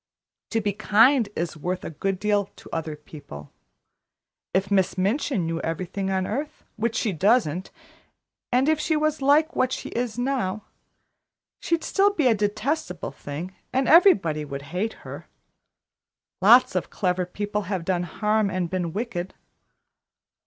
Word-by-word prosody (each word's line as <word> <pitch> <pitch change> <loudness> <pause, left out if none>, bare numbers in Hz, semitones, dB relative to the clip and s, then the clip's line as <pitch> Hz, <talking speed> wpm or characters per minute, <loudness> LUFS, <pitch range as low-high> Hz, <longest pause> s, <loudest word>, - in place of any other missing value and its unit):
To 225 - 0
be 205 -1 -1
kind 225 +3 +4
is 170 -1 -3
worth 180 +4 -4
a - - -5
good 190 +5 -2
deal 205 +1 +1
to - - -14
other 160 -2 -3
people. 145 - -11 1.0
If 190 +2 0
Miss 190 -1 +2
Minchin 200 - 0
knew 165 0 -2
everything 185 +4 -3
on 190 -1 0
earth, 285 +9 -4
which 225 +1 -1
she 220 - 0
doesn't, 190 -2 +1 0.8
and 255 +3 +3
if 315 -1 +3
she 315 - 0
was 310 -1 0
like 300 +4 +3
what 255 0 +1
she - - -4
is 240 -2 -3
now, 245 -6 -1 1.0
she'd 335 -1 -1
still 400 +1 +3
be 340 -8 -1
a 245 - +6
detestable 210 - -2
thing, 145 +7 -7 0.2
and 265 +1 +1
everybody 195 - +5
would 140 -1 -6
hate 215 +5 -1
her. - - -8 1.1
Lots - - +7
of - - -2
clever 180 -2 -1
people 205 +3 -3
have 185 -5 -2
done 180 -1 0
harm 210 +3 0
and 185 -3 -2
been 175 -3 -2
wicked. 195 -5 -4
205 Hz, 150 wpm, -25 LUFS, 180-250 Hz, 1.1 s, Lots